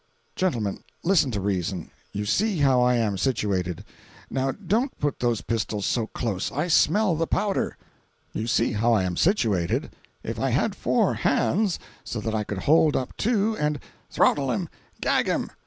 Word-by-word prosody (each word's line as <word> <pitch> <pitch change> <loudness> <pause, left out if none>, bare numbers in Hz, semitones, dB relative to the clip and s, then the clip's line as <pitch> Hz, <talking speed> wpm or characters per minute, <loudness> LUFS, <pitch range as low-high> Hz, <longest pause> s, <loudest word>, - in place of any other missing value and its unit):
"Gentlemen, 115 - -1 0.2
listen 170 -6 +3
to 105 -4 -2
reason. 95 -2 -2 0.2
You 105 +1 -3
see 205 - +1
how 135 -4 +4
I 125 0 +4
am 105 -5 0
situated—now 105 +5 -2
don't 215 - -1
put 145 -1 -1
those 120 -3 0
pistols 110 -3 -2
so 115 -3 0
close—I 120 - -2
smell 195 +2 +4
the 165 +1 -1
powder. 205 -2 0 0.6
"You 110 - -3
see 120 -1 +2
how 115 +2 +2
I 105 -4 +3
am 90 -1 -2
situated. 110 - +1 0.3
If - - -4
I - - +1
had - - +1
four - - +1
hands—so 170 - -1
that 110 +1 -3
I 110 -1 0
could 100 -2 -5
hold 155 0 +4
up 130 - -2
two 220 -1 +1
and—" 150 -1 0 0.3
"Throttle - - +2
him! - - -2 0.3
Gag - - +2
him! - - -1
120 Hz, 155 wpm, -25 LUFS, 105-165 Hz, 0.6 s, how